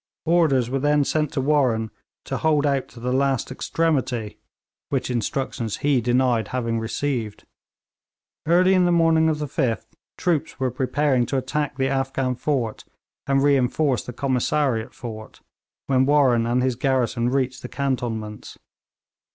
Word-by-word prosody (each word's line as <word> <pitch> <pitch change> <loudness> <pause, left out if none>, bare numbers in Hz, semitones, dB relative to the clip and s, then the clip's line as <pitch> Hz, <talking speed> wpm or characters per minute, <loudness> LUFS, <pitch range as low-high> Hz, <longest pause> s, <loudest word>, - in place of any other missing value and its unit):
Orders 160 -7 +3
were 135 - 0
then 145 +1 +3
sent 150 +1 0
to 140 - 0
Warren 130 -7 +1 0.3
to - - -3
hold 150 -2 +2
out 140 -2 0
to 120 - -14
the 125 +2 -2
last 135 -2 0
extremity; 130 -7 -1 0.5
which - - -1
instructions 120 -1 -2
he 140 -4 +3
denied 120 -2 +1
having 115 -3 -2
received. 115 -1 -3 1.0
Early 180 +3 +4
in 185 -1 +4
the 175 - +3
morning 165 -1 +4
of 155 - 0
the 150 - -3
5th 125 -6 -1 0.3
troops 170 -6 -1
were 130 -1 0
preparing 130 0 +1
to 135 - -1
attack 135 +1 -2
the 135 -1 +1
Afghan 135 -1 -1
fort 125 -4 -2 0.4
and 135 0 +2
reinforce 140 -2 +2
the - - -7
Commissariat 130 -1 0
fort, 110 -3 -9 0.4
when 130 -1 +2
Warren 130 -6 +3
and 125 +1 +1
his 130 -2 +1
garrison 125 -2 0
reached 130 -1 -1
the - - -7
cantonments. 115 -6 -3
130 Hz, 145 wpm, -23 LUFS, 120-145 Hz, 1.0 s, Early